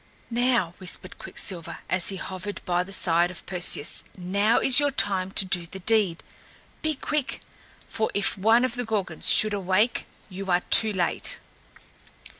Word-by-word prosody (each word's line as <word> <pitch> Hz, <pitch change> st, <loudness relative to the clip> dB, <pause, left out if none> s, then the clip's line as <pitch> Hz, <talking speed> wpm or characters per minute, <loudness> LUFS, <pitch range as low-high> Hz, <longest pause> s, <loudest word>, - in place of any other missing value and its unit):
"Now," 235 Hz, -7 st, 0 dB
whispered 185 Hz, 0 st, -3 dB
Quicksilver 175 Hz, -4 st, -4 dB
as 185 Hz, -2 st, 0 dB
he 195 Hz, -, -4 dB
hovered 190 Hz, +2 st, -7 dB
by 180 Hz, -1 st, 0 dB
the 180 Hz, +2 st, -8 dB
side 175 Hz, -2 st, +1 dB
of 180 Hz, -2 st, -11 dB
Perseus 175 Hz, -5 st, 0 dB
"now 200 Hz, +5 st, 0 dB
is 265 Hz, 0 st, +5 dB
your 290 Hz, 0 st, +2 dB
time 195 Hz, -8 st, +1 dB
to 195 Hz, -, +3 dB
do 180 Hz, -2 st, -3 dB
the 190 Hz, -, -10 dB
deed! 195 Hz, -3 st, 0 dB, 0.6 s
Be 310 Hz, -1 st, -1 dB
quick, 290 Hz, 0 st, -3 dB, 0.5 s
for 220 Hz, -, -3 dB
if 200 Hz, -, 0 dB
one 225 Hz, +5 st, +3 dB
of 255 Hz, -, -3 dB
the 245 Hz, 0 st, -3 dB
Gorgons 200 Hz, -8 st, -1 dB
should 215 Hz, -1 st, +7 dB
awake, 200 Hz, +4 st, 0 dB, 0.2 s
you 195 Hz, 0 st, -8 dB
are 175 Hz, 0 st, +2 dB
too 220 Hz, -1 st, +8 dB
late!" 180 Hz, -4 st, -1 dB
195 Hz, 160 wpm, -24 LUFS, 180-220 Hz, 0.6 s, too